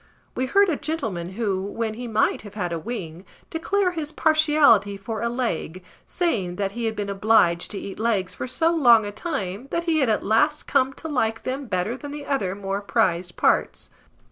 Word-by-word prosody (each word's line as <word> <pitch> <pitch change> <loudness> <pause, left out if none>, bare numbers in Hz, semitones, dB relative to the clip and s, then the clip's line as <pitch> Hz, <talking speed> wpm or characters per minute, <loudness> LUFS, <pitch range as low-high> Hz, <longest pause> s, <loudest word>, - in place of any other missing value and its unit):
We 260 - -1
heard 400 +7 +4
a 325 -6 0
gentleman 215 - -3
who, 200 -3 -1
when 215 +3 -3
he 245 +2 -6
might 220 -1 +1
have 205 -1 -12
had 180 -5 -2
a 165 - -2
wing, 180 -5 -6 0.3
declare 365 +3 0
his 315 -3 -5
partiality 300 -12 +4
for 215 +3 -5
a 235 - 0
leg, 185 -8 -3 0.2
saying 210 - -1
that 195 0 -2
he 235 +2 -4
had 220 -1 -1
been 205 -1 -3
obliged 195 -4 +2
to 205 - -5
eat 195 0 -7
legs 215 -5 0
for - - -5
so 325 +6 +1
long 240 -9 +6
a 205 - -4
time, 215 - -4
that 335 - -1
he 330 -2 +1
had 265 -5 +2
at 215 - 0
last 295 +8 +2
come 270 -1 +2
to 320 - -8
like 225 -7 -1
them 265 +1 -4
better 185 +4 -1
than 290 +2 -8
the 290 0 -7
other 200 -11 -1
more 195 0 -3
prized 185 -5 0
parts. - - +1
225 Hz, 200 wpm, -24 LUFS, 195-285 Hz, 0.3 s, long